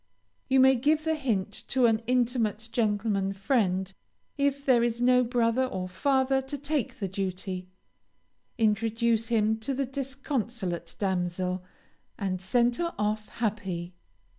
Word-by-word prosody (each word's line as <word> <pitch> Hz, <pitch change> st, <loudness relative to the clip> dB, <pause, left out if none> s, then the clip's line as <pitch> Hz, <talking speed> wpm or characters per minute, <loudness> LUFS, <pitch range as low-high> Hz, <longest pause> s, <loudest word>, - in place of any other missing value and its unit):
You 265 Hz, 0 st, +4 dB
may 265 Hz, 0 st, +7 dB
give 300 Hz, +5 st, +2 dB
the 320 Hz, 0 st, +1 dB
hint 220 Hz, -10 st, -2 dB
to 255 Hz, -1 st, +3 dB
an 225 Hz, -1 st, +3 dB
intimate 235 Hz, -3 st, 0 dB
gentleman 205 Hz, -3 st, 0 dB
friend, 195 Hz, -3 st, 0 dB, 0.4 s
if 280 Hz, -1 st, 0 dB
there 250 Hz, -3 st, +5 dB
is 235 Hz, 0 st, 0 dB
no 250 Hz, +1 st, +5 dB
brother 240 Hz, +1 st, +2 dB
or 185 Hz, -7 st, -4 dB
father 265 Hz, +6 st, +1 dB
to 270 Hz, +2 st, -6 dB
take 285 Hz, -2 st, -2 dB
the 200 Hz, -5 st, -2 dB
duty, 185 Hz, -1 st, -4 dB, 0.9 s
introduce 225 Hz, +1 st, +1 dB
him 220 Hz, -1 st, +2 dB
to 260 Hz, +5 st, -2 dB
the 275 Hz, +1 st, 0 dB
disconsolate 255 Hz, -, -3 dB
damsel, 180 Hz, -1 st, -1 dB, 0.5 s
and 185 Hz, -2 st, -2 dB
send 240 Hz, +5 st, +2 dB
her 340 Hz, 0 st, -2 dB
off 210 Hz, 0 st, -1 dB
happy. 190 Hz, -6 st, -3 dB
230 Hz, 135 wpm, -28 LUFS, 195-260 Hz, 0.9 s, may